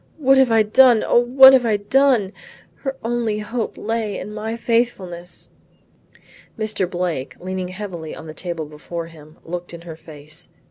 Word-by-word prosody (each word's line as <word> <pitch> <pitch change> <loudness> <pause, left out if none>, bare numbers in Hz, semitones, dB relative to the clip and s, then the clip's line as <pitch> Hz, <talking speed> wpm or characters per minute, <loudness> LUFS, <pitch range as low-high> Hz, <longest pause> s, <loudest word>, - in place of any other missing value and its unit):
What 270 -3 +4
have 260 -3 +4
I 225 -1 +5
done, 240 +1 +5
O - - +4
what 265 +2 +8
have 260 -2 +5
I 220 -3 +1
done! 230 -2 +2 0.4
Her 270 -1 -5
only 230 -2 -1
hope 225 +2 -4
lay 220 -2 -3
in 210 - -7
my 220 +2 -4
faithfulness." 195 -8 -2 1.1
Mr. 215 -4 -1
Blake 175 -7 -3
leaning 185 0 -4
heavily 185 -4 -7
on - - -10
the 155 - -8
table 170 -1 -5
before 155 +3 -7
him, 155 -2 -15
looked 175 0 -6
in 170 - -11
her 170 -2 -9
face. 155 0 -10
205 Hz, 160 wpm, -20 LUFS, 170-235 Hz, 1.1 s, what